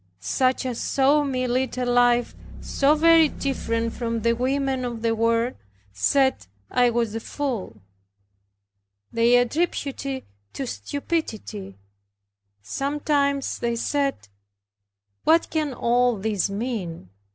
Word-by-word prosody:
Such 255 - 0
as 245 -2 -3
saw 280 +2 +3
me 255 -3 -1
lead 255 +1 -1
a 250 - 0
life 245 0 +3 0.3
so 285 +2 +2
very 325 0 +6
different 230 -5 -2
from 230 -1 -2
the 230 +1 +2
women 265 +1 0
of 235 -2 -4
the 230 -1 +2
world 230 +2 +1 0.4
said 265 - +2 0.2
I 245 -1 +4
was 235 -2 0
a 225 - -2
fool. 230 - -4 1.3
They 235 +1 +4
attributed 280 +2 -1 0.2
it - - -30 0.3
to 270 - -4
stupidity. 225 - -4 0.9
Sometimes 280 - -1
they 235 0 -1
said, 275 - -1 1.0
"What 330 +1 +3
can 310 -3 0
all 245 0 +2
this 205 -1 -1
mean? 195 - -4
245 Hz, 120 wpm, -24 LUFS, 230-275 Hz, 1.3 s, very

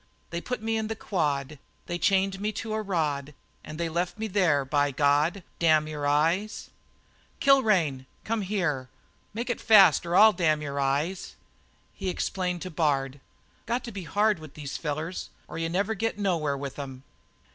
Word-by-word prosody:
They 170 - -3
put 250 +1 -4
me 225 0 0
in 220 -1 -2
the 220 - -3
quad, 150 -8 -2 0.3
They 175 0 -4
chained 195 +1 +2
me 210 +1 0
to 215 +1 -4
a 220 - -1
rod, 150 -7 -2 0.3
And 155 +1 -8
they 170 - 0
left 170 +4 -2
me 220 - -3
there, 180 -9 +2
by 145 +1 +2
God 145 +7 +2 0.2
Damn 155 -2 +4
your 150 -2 -3
eyes!" 165 +9 0 0.7
"Kilrain, 190 - +3 0.2
come 225 0 -1
here 180 -8 0
and 130 - -14 0.5
make 240 +2 -2
it - - -4
fast 195 -8 +7
or 170 - 0
I'll 215 +2 +8
damn 160 -4 +2
your 140 -1 -3
eyes!" 145 +7 -1 0.6
He 195 -2 -4
explained 180 -1 -2
to 185 - -6
Bard: 140 -4 0 0.5
"Got 240 +2 -1
to 235 - -6
be 195 -4 -7
hard 205 +3 +2
with 155 -3 -12
these 145 -2 -6
fellers 155 +3 -4 0.2
or - - -6
you 165 0 -1
never 200 +5 0
get 225 0 -2
nowhere 165 -8 0
with 140 0 -6
'em." 135 -2 -7
170 Hz, 180 wpm, -27 LUFS, 145-205 Hz, 0.7 s, I'll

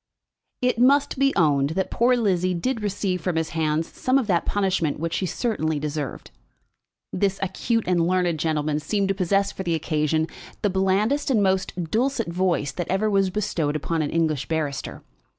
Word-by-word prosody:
It 250 -2 +1
must 275 +2 +3
be 275 0 +4
owned 145 -6 +3
that 190 - -1
poor 245 +2 +3
Lizzie 185 -5 +1
did 230 +7 -2
receive 195 -3 -1
from 180 -1 -1
his 160 0 0
hands 160 0 0
some 255 +1 0
of 265 - +1
that 180 -5 0
punishment 190 -7 0
which 165 +1 -2
she 185 +2 -1
certainly 160 -9 -1
deserved. 145 -2 -4 0.8
This 195 0 0
acute 225 +4 -1
and 175 -2 +2
learned 180 -3 +1
gentleman 155 -1 0
seemed 195 +5 -1
to - - +3
possess 195 +1 +1
for - - -7
the 170 -3 0
occasion 155 0 0 0.4
the 205 - +2
blandest 195 +10 +1
and 220 -6 +3
most 185 -3 -1
dulcet 240 -2 0
voice 175 -5 0
that 175 +3 -5
ever 210 +3 +1
was 195 -1 +3
bestowed 180 -7 -1
upon 160 +2 -1
an 145 - -1
English 155 -4 0
barrister. 150 -4 -3
185 Hz, 175 wpm, -24 LUFS, 160-205 Hz, 0.8 s, be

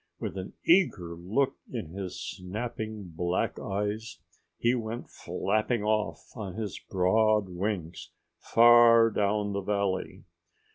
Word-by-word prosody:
With - - -4
an 95 -1 -6
eager 105 - +3
look 110 +11 0
in 110 -11 -5
his 95 +1 -6
snapping 110 +1 -5
black 90 +2 -1
eyes 105 -1 -3 0.4
he 120 +1 +2
went 115 -1 -4
flapping 110 +1 -1
off 105 0 -1
on 100 -6 -6
his 105 -4 -4
broad 105 +2 +2
wings, 90 -2 -4 0.3
far 115 -1 +6
down 105 0 0
the 100 - -1
valley. 95 -1 -2
105 Hz, 115 wpm, -28 LUFS, 95-115 Hz, 0.4 s, far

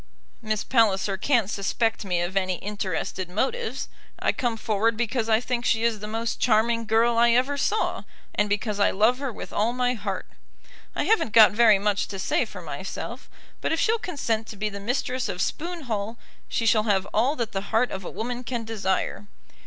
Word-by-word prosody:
Miss 215 -2 -1
Palliser 205 -5 +2
can't 230 +1 +2
suspect 220 +3 -1
me 180 -3 0
of 175 +2 -3
any 185 -1 +1
interested 185 -2 -3
motives. 360 - -2 0.3
I - - +1
come 240 -3 -1
forward 220 +1 +1
because 235 -1 -1
I 220 0 +5
think 245 0 -2
she 225 -1 +2
is 230 -2 +1
the 210 - -6
most 225 +2 -3
charming 230 0 +2
girl 230 +1 +3
I 235 0 +5
ever 260 +4 +2
saw, 430 +9 0 0.3
and 210 0 +1
because 205 0 -1
I 200 - +5
love 220 +6 +3
her 275 -2 -2
with - - -9
all 220 +3 +1
my 250 0 +1
heart. 200 -5 -4 0.7
I - - 0
haven't 435 - +2
got 220 -1 +9
very 220 -1 +6
much 205 0 0
to 195 - -6
say 190 - +1
for - - -10
myself, - - -6 0.3
but - - -1
if 325 - +1
she'll 450 +1 +2
consent 230 - -2
to - - -8
be 210 +1 -2
the 200 -1 -7
mistress 250 +2 -1
of 180 -2 -4
Spoon 340 - -2
Hall, 225 -3 -3 0.3
she 230 - -1
shall 215 -1 +4
have 195 -1 +2
all 250 +7 +2
that 235 -5 -3
the 195 +1 -4
heart 225 +3 +2
of 190 - -5
a - - -5
woman 240 +5 -4
can 240 -1 -3
desire. 205 -2 -2
225 Hz, 200 wpm, -25 LUFS, 205-240 Hz, 0.7 s, got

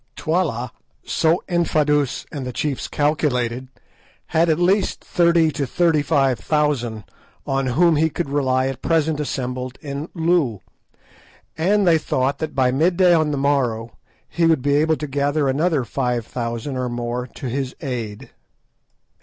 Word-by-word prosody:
Twala, 155 -8 -1 0.3
so 160 +2 +1
Infadoos 150 -5 +1
and 145 -4 -5
the 125 - -4
chiefs 135 +3 -2
calculated, 130 -5 0 0.7
had 165 +1 +3
at 155 - +3
least 190 +3 +1
thirty 170 -2 +3
to 140 -1 -3
thirty 165 +2 +2
five 135 -4 +1
thousand 135 -8 0 0.4
on 135 0 -1
whom 160 +5 +3
he 160 +2 +3
could 170 +1 -3
rely 130 -2 +1
at 135 -1 -4
present 160 -2 +1
assembled 130 -3 -4
in 145 +2 -6
Loo, 160 - +1 0.9
and 195 +6 +2
they 165 -2 +4
thought 135 -1 -1
that 155 - -4
by 130 -2 +3
midday 175 +6 +3
on 155 -2 +3
the 145 - -1
morrow 125 -5 0 0.3
he 170 -1 +1
would 160 -6 +2
be 140 0 +2
able 155 +2 +3
to 150 - -4
gather 145 +1 0
another 150 +1 +1
five 125 -3 -2
thousand 120 +3 -4
or 125 -1 -2
more 120 +1 -3
to 135 - -5
his 130 +1 -3
aid. 120 -8 -5
145 Hz, 150 wpm, -21 LUFS, 125-160 Hz, 0.9 s, they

